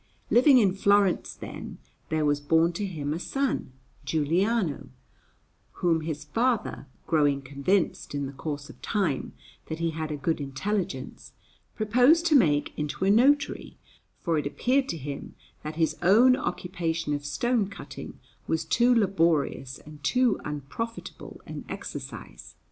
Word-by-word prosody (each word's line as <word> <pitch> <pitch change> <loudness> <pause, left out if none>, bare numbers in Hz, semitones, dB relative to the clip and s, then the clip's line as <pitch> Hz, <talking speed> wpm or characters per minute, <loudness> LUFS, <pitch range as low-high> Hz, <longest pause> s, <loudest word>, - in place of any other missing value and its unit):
Living 260 +2 +7
in 200 -6 +4
Florence, 200 -1 +2
then, - - -8 0.3
there 155 -1 +1
was 145 0 +2
born 165 +3 +3
to 200 +3 -3
him 150 -5 -3
a 165 - -3
son, 270 - -2 0.3
Giuliano, 165 +5 0 0.8
whom 165 -2 +1
his 155 -2 -4
father, 225 - -1 0.2
growing 145 -4 +2
convinced 145 +5 -1
in 140 -1 -1
the 135 - -5
course 145 0 -5
of - - -14
time 190 - -1 0.3
that 160 - -4
he 165 0 -1
had 160 0 -4
a 150 - -3
good 155 +2 -1
intelligence, 140 0 -4 0.4
proposed 250 +10 +4
to 325 -3 +4
make 150 - +3
into 150 +4 -2
a 195 - +4
notary, 280 +6 +2 0.4
for 165 -2 0
it 145 - -2
appeared 260 - +1
to 165 - -2
him 140 -1 -7 0.3
that 155 +1 -6
his 160 -1 +1
own 225 +8 +6
occupation 165 -8 -2
of 145 0 -3
stone 205 - 0
cutting 200 - -9 0.3
was 160 0 0
too 245 +1 +3
laborious 165 - +1
and 150 -1 -14
too 250 - +2
unprofitable 150 - -6
an - - -7
exercise. - - -8
165 Hz, 145 wpm, -27 LUFS, 145-215 Hz, 0.8 s, Living